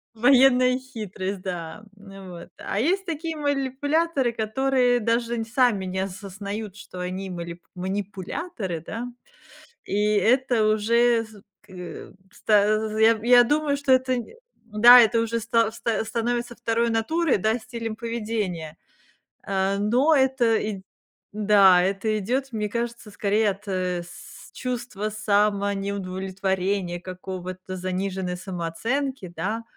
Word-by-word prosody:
Военная 255 +1 +5
хитрость, 205 -6 -6
да. 175 +1 -6 0.2
М, 195 -2 -12
вот. 170 -1 -10
А 200 - -3
есть 370 - +1
такие 325 -2 -4
манипуляторы, 285 0 0
которые 245 +2 +1
даже 230 +1 0
н 225 - -2
сами 230 -4 +1
не 185 +1 -4
осознают, 200 +2 -5
что 185 -2 -10
они 185 +2 -4
малип 170 -1 -7
манипуляторы, 195 - -4
да. 230 +3 -5 0.8
И - - -4 0.2
это 240 0 +3
уже 230 +2 +3
з 215 -2 -15 0.2
к 210 - -23
э, 180 -2 -9 0.2
ста 210 +1 +2
з 220 0 -3
з - - -1
я 225 0 +5
я 245 0 +7
думаю, 295 +3 +1
что 280 -2 +1
это 255 0 +3
не 240 - -8 0.3
Да, 235 +3 +8
это 230 0 +4
уже 230 0 -1
ста 230 0 +2
ста 225 -1 -2
становится 240 +2 -2
второй 235 0 0
натурой, 280 +6 +1
да, 220 +4 +1
стилем 230 -1 -6
поведения. 210 -9 -4 0.7
Э, 195 0 0
но 245 +10 +3
это 265 -4 +3
ид 205 -3 -4 0.5
Да, 200 -3 +5
это 195 +4 0
идёт, 255 +6 -2
мне 210 -1 -2
кажется, 235 0 -4
скорее 205 +1 +1
от, 195 +2 -11
э, 180 -2 -2
с 175 - -13
чувства 240 -5 -4
самонеудовлетворения 195 -3 -1
какого-то, 185 0 -7
заниженной 185 0 -3
самооценки, 190 - -3
да, 210 +8 -3
215 Hz, 130 wpm, -24 LUFS, 190-240 Hz, 0.8 s, Да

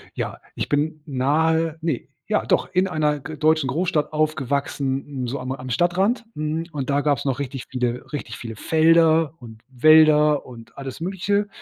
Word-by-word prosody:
Ja, - - -4 0.2
ich - - -3
bin 150 +1 0
nahe 160 +4 +1
ne, 160 -6 -2 0.2
ja - - 0
doch - - +1
in 185 +1 +3
einer 150 -3 0
g 155 +3 -8
deutschen 155 -2 +2
Großstadt 155 +2 -1
aufgewachsen, 140 -2 -1 0.2
n - - -2
so 135 +4 -3
am 130 +1 -5
am 130 -1 -6
Stadtrand, 185 - +1
mhm, 155 +2 -2
und 140 -2 -4
da 140 0 +2
gabs 145 -3 0
noch 135 -1 -1
richtig 135 -2 -5
viele 125 -1 -3
richtig 130 -6 -5
viele 115 -2 -7
Felder 160 +2 +3
und 110 -3 -12
Wälder 150 +2 +5
und 115 -3 -13
alles 135 -2 -7
Mögliche. 200 +3 0
150 Hz, 170 wpm, -22 LUFS, 130-160 Hz, 0.2 s, Wälder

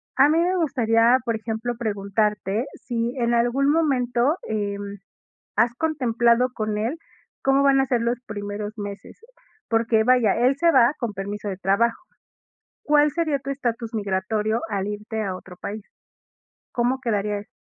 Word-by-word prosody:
A 280 +2 +6
mí 315 - +3
me 360 +2 +2
gustaría, 240 -7 +3
por 230 -2 0
ejemplo, 225 +2 -3
preguntarte 210 0 -1
si 235 -1 -3
en 240 -1 +1
algún 245 +4 +2
momento, 270 -2 +1
em, 205 -1 -3 0.6
has 235 0 +3
contemplado 250 -5 +2
con 215 -2 -2
él 230 +9 -2 0.5
cómo 270 +1 +3
van 275 -1 +5
a 270 - +3
ser 245 -3 +1
los 235 +1 0
primeros 205 0 -5
meses, 205 0 -8 0.5
porque, 225 -1 +2
vaya, 245 -3 +4
él 250 +4 +3
se 335 +2 +4
va 260 -2 +5
con 235 -4 -3
permiso 205 +2 -5
de 190 - -4
trabajo. 200 +5 +1 0.8
¿Cuál 295 0 +4
sería 315 -3 0
tu 275 0 -6
estatus 240 -4 -3
migratorio 210 +2 -1
al 200 -2 -2
irte 210 +1 -4
a 190 -3 -3
otro 185 0 -12
país? 205 +3 -6 0.9
¿Cómo 250 +2 0
quedaría 210 -3 -1
esto? 205 - -10
230 Hz, 155 wpm, -23 LUFS, 210-255 Hz, 0.9 s, A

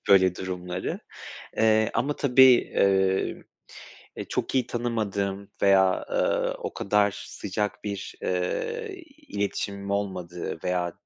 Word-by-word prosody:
böyle 95 -2 +6
durumları. 90 0 -4 0.6
Eee, 110 0 +4
ama 140 +6 0
tabii, 130 -2 +5 0.3
eee, 95 -1 +2 0.7
eee, - - -4
çok - - -2
iyi 130 -2 +2
tanımadığım 100 -4 -2
veya, 95 -1 +4
ııı, - - +1
o - - -5
kadar 105 0 +2 0.2
sıcak 105 +2 -4
bir, 100 -2 -5
eee, 435 - -2 0.3
iletişimim 100 0 -3
olmadığı 90 -4 -3
veya 90 -1 0
100 Hz, 110 wpm, -26 LUFS, 95-110 Hz, 0.7 s, böyle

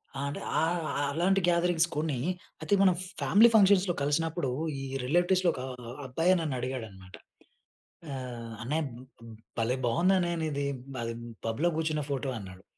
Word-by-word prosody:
ఆ! - - -4
అంటే 145 - -5 0.2
ఆహ్, 165 +2 +1 0.2
ఆహ్, 145 - +1
అలాంటి 185 +5 +2
గ్యాదరింగ్స్ 170 -1 +3
కొన్ని, 150 -4 -1 0.4
అయితే - - -1
మనం 185 -2 +6 0.3
ఫ్యామిలీ 225 +4 +6
ఫంక్షన్స్‌లో 195 -3 +5
కలిసినప్పుడు, 155 0 0 0.3
ఈ - - -5 0.2
రిలేటివ్స్‌లో 175 +4 +3
ఒక - - -6 0.2
ఆహ్, 120 +2 -8
అబ్బాయే 165 +8 +2
నన్నుడిగాడన్నమాట. 120 - -5 1.0
ఆహ్, 120 -3 -6
"అన్నయ్య 150 +7 -1
బ్ 120 - -11 0.3
బ్ - - -10 0.3
భలే 125 +3 +1
బాగుందన్నయ్య 175 +4 +2
నీది 140 -2 -1 0.3
బ - - -4 0.5
పబ్‌లో 125 +10 +1
కూర్చున్న 155 -2 0
ఫోటో 135 -1 -1
అన్నాడు." 95 -1 -11
155 Hz, 140 wpm, -29 LUFS, 125-175 Hz, 1.0 s, మనం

